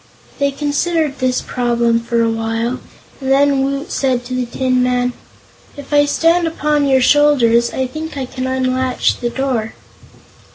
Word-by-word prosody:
They 280 0 +2
considered 295 +1 -1
this 255 -1 0
problem 235 -2 0
for 230 0 0
a 230 - +1
while, 225 +2 -2 0.4
and 265 -1 -2
then 275 0 +3
Woot 275 +2 -3
said 255 -3 0
to 255 - -6
the 255 -1 -2
Tin 255 +1 0
Man: 250 0 0 0.6
"If 285 +1 -8
I 290 0 +5
stand 330 +3 +2
upon 300 -2 0
your 265 -1 +3
shoulders, 250 -5 +4
I 260 - -2
think 310 +4 -7
I 265 - -2
can 255 +1 -5
unlatch 260 -1 0
the 240 - -2
door." 245 -4 -2
260 Hz, 160 wpm, -17 LUFS, 245-285 Hz, 0.6 s, I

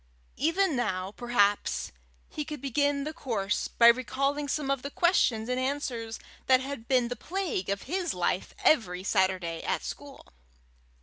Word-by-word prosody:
Even 330 +3 +2
now 190 -6 -1
perhaps 205 -3 +1 0.4
he 300 - -4
could 300 0 -6
begin 280 +1 0
the 310 +2 -4
course 205 -9 -2
by 235 - +3
recalling 275 +4 +2
some 280 -1 -1
of 275 -2 0
the 280 - -5
questions 275 -10 +2
and 250 0 -1
answers 255 -4 -2 0.3
that 260 -1 +6
had 260 -3 -6
been 250 -3 +3
the 245 - -3
plague 345 - -3
of 200 0 -2
his 355 +4 -1
life - - -1
every 185 - +3
Saturday 185 -4 0
at - - -2
school. 285 -1 -8
260 Hz, 150 wpm, -28 LUFS, 220-285 Hz, 0.4 s, that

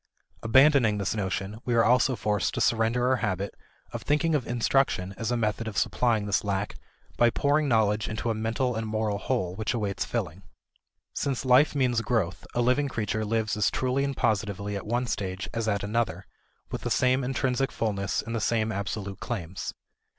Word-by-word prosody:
Abandoning 130 -2 +5
this 100 -2 -1
notion, 100 0 -3
we 120 - 0
are 115 - +5
also 125 +2 +3
forced 105 -4 -1
to - - -1
surrender 115 +2 +2
our 130 0 +3
habit 100 -3 -2 0.4
of - - -4
thinking 155 +3 +1
of 140 -5 0
instruction 120 -5 +1
as 115 +2 -3
a 120 - +1
method 110 0 -1
of 105 - -5
supplying 115 -4 +1
this 100 - +1
lack 100 0 -2 0.4
by 120 - +5
pouring 145 +5 +1
knowledge 110 -3 +2
into 115 +2 -2
a - - +1
mental 115 +3 -1
and 110 0 -3
moral 110 -2 -1
hole 90 -2 -1
which 110 +4 -2
awaits 105 -3 -1
filling. 95 -6 -3 0.7
Since 135 -2 -2
life 130 +4 +5
means 125 -4 +2
growth, 100 -8 -1
a 120 - +2
living 130 +4 +2
creature 110 -2 -2
lives 110 0 0
as 105 -2 +2
truly 130 +2 0
and 140 -1 -2
positively 100 -1 -1
at 100 - -5
one 120 +3 0
stage 95 -5 -3
as 115 -1 -2
at 100 -2 0
another, 115 +3 -1 0.5
with - - -4
the - - -3
same 130 +1 +2
intrinsic 135 0 0
fullness 100 -4 -1
and 115 +1 -4
the 115 - -1
same 110 0 +1
absolute 100 -1 -4
claims. 95 -6 -4
110 Hz, 185 wpm, -27 LUFS, 100-125 Hz, 0.7 s, Abandoning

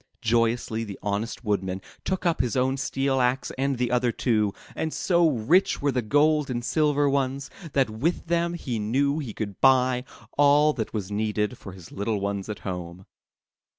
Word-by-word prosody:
Joyously 115 0 +1
the 100 -3 -7
honest 105 +4 -3
Woodman 95 -3 -1 0.2
took 190 -1 -2
up 170 -2 +2
his 125 0 -1
own 130 +1 +2
steel 135 0 0
axe 125 +1 0
and 135 0 0
the 125 0 0
other 125 -1 +2
two, 110 -4 +1 0.2
and 160 - -2
so 170 -1 +3
rich 150 - +2
were 140 0 +1
the 125 -1 0
gold 150 +5 +2
and 120 -2 -3
silver 145 -1 +2
ones, 135 0 -1 0.2
that 135 -5 +2
with 140 +11 -1
them 170 +1 0
he 125 -9 -3
knew 140 +8 +1
he 125 -8 -6
could 100 -3 -5
buy 130 -1 +4 0.4
all 145 +1 +5
that 110 -6 -4
was 105 -3 -4
needed 105 +2 -1
for 100 -5 -10
his 90 -3 -13
little 105 +1 -2
ones 100 0 -3
at 105 - -5
home. 90 -1 -6
125 Hz, 180 wpm, -26 LUFS, 105-140 Hz, 0.4 s, all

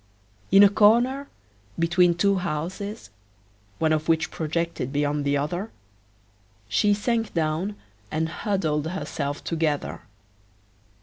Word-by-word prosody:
In 195 +1 +8
a 200 - +8
corner, 240 +7 +3 0.5
between 170 +1 +3
two 200 +2 +2
houses, 180 - -4 0.7
one 160 -1 +2
of 155 +1 -1
which 160 -1 +2
projected 165 -4 -2
beyond 145 0 0
the 140 0 +2
other, 175 +9 -3 1.0
she 120 - +2
sank 225 0 -1
down 165 +5 -1 0.3
and 160 +1 -1
huddled 160 -5 -1
herself 145 -5 -4
together. 160 -3 -2
165 Hz, 110 wpm, -25 LUFS, 150-200 Hz, 1.0 s, In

